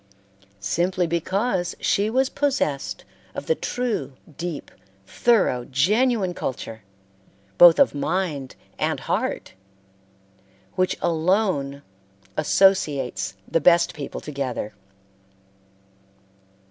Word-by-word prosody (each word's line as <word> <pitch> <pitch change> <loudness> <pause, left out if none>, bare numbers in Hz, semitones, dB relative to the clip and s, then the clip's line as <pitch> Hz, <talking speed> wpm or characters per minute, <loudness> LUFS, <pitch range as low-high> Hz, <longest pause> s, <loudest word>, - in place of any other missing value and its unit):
Simply 175 - 0
because 180 +3 -1
she 205 +2 +1
was 260 +3 +2
possessed 265 - -1 0.3
of - - -5
the 480 - +3
true, 240 - -3 0.2
deep, 170 -3 -5 0.3
thorough 195 - +2
genuine 200 - +2
culture, 115 -7 -5 0.8
both 175 -1 +9
of 280 - +4
mind 145 -2 -2 0.2
and - - -1
heart, - - -2 1.2
which 185 0 0
alone 165 -5 0 0.5
associates, 145 - +2
the 165 - +1
best 170 +2 +4
people 145 -2 -6
together. 135 -7 -4
170 Hz, 85 wpm, -23 LUFS, 140-195 Hz, 1.2 s, both